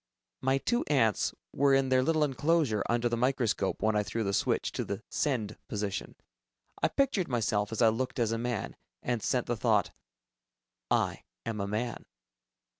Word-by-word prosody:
My 135 +1 +2
two 240 - 0
ants 115 -9 +2 0.2
were 140 0 +4
in 135 -1 +2
their 130 0 +4
little 155 +3 +2
enclosure 145 -5 +2
under 120 0 +2
the 120 - 0
microscope 120 -5 0
when 110 0 +3
I 105 - +3
threw 110 +2 -2
the 100 -1 -1
switch - - +1
to - - -2
the - - -5
"send" 110 -8 -1
position. 105 -2 -3 0.7
I - - +4
pictured 260 -10 +1
myself 105 -4 0
as 110 +1 +1
I 115 - +7
looked 125 +3 -2
as 115 -3 +1
a 115 - -1
man, 120 -3 -3 0.3
and 120 -2 -1
sent 125 +4 0
the 120 - -1
thought, 110 -4 +2 1.0
"I - - +1 0.2
am 110 -3 -2
a 100 - -2
man." 110 +4 -3
120 Hz, 175 wpm, -30 LUFS, 110-135 Hz, 1.0 s, I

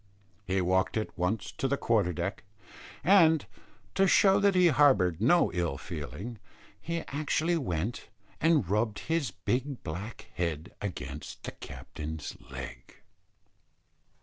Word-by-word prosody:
He 95 0 +1
walked 95 +4 +1
at 110 - -3
once 95 +4 -1
to 135 - -2
the 140 +1 0
quarter 110 -9 +2
deck; 85 - -3 0.6
and, 165 -5 +6 0.5
to 195 - +4
show 195 +1 +5
that 200 -1 +3
he 180 -1 +6
harboured 130 - +4
no 170 +9 +4
ill 85 -6 -1
feeling, 100 - -6 0.4
he 170 +5 -2
actually 155 +3 0
went 110 - -2 0.3
and 160 - +3
rubbed 105 +2 +1 0.2
his 160 -7 +1
big 130 +7 -2
black 95 +8 -6
head 85 +1 -3
against 75 -8 -6
the - - -4
captain's 75 0 -7
leg. - - -8
110 Hz, 125 wpm, -30 LUFS, -, 0.6 s, and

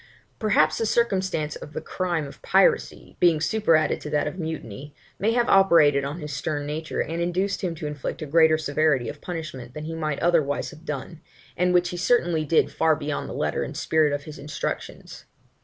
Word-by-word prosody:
Perhaps 155 -8 +2
the 225 - 0
circumstance 190 -10 0
of 150 - -10
the - - -3
crime 175 -4 -2
of 140 - -12
piracy, 195 0 +1
being 170 -3 +4
superadded 160 -3 +2
to 150 - -6
that 150 -1 +1
of 150 +5 -5
mutiny, 150 - -6 0.2
may 220 +3 +1
have 240 0 +2
operated 165 -8 +5
on 140 +3 -4
his 150 -2 -6
stern 145 0 -3
nature, 155 +2 -3
and 165 +1 -3
induced 180 +3 -1
him 175 -3 -2
to 155 - -7
inflict 150 +2 -4
a - - -4
greater 160 +1 +4
severity 150 -4 +1
of 145 - -9
punishment 145 -8 -7
than 150 - -6
he 160 +1 -5
might 155 -3 -2
otherwise 160 -5 +1
have 155 - -15
done, 150 +3 -6 0.3
and 180 +1 +2
which 180 0 +3
he 175 - -5
certainly 175 -6 +2
did 155 +2 +2
far 160 -1 +2
beyond 150 -1 -4
the - - -6
letter - - -1
and - - -5
spirit 155 -2 +2
of 145 0 -2
his 155 -1 -10
instructions. 145 +2 -6
155 Hz, 195 wpm, -24 LUFS, 150-175 Hz, 0.3 s, operated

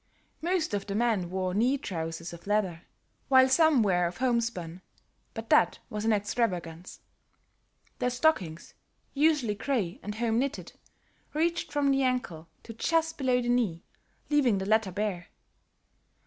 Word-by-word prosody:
Most 345 - 0
of 200 0 -2
the 200 - -3
men 215 -6 +1
wore 185 0 -2
knee 245 +7 +2
trousers 165 -5 -5
of 170 +3 -12
leather, 195 -5 -1 0.4
while 260 -1 +6
some 295 -2 +4
were 180 -3 +2
of 175 - -7
homespun, 230 -9 -1 0.5
but - - -7
that - - +4
was 210 0 -3
an 225 - +3
extravagance. 190 -5 -2 1.0
The 250 - +1
stockings, 245 - 0 0.4
usually 290 -6 +2
grey 205 -5 -2
and 210 +1 -6
home 230 0 0
knitted, 275 +3 -3 0.6
reached 335 +2 0
from 285 -1 +2
the 270 0 +2
ankle 245 -11 -2 0.2
to 225 - -9
just 325 +6 0
below 250 -2 +1
the 240 - -2
knee 220 -9 0 0.5
leaving 265 -8 +3
the 190 - -3
latter 215 -1 +2
bare. 195 -2 -3
225 Hz, 145 wpm, -28 LUFS, 185-260 Hz, 1.0 s, while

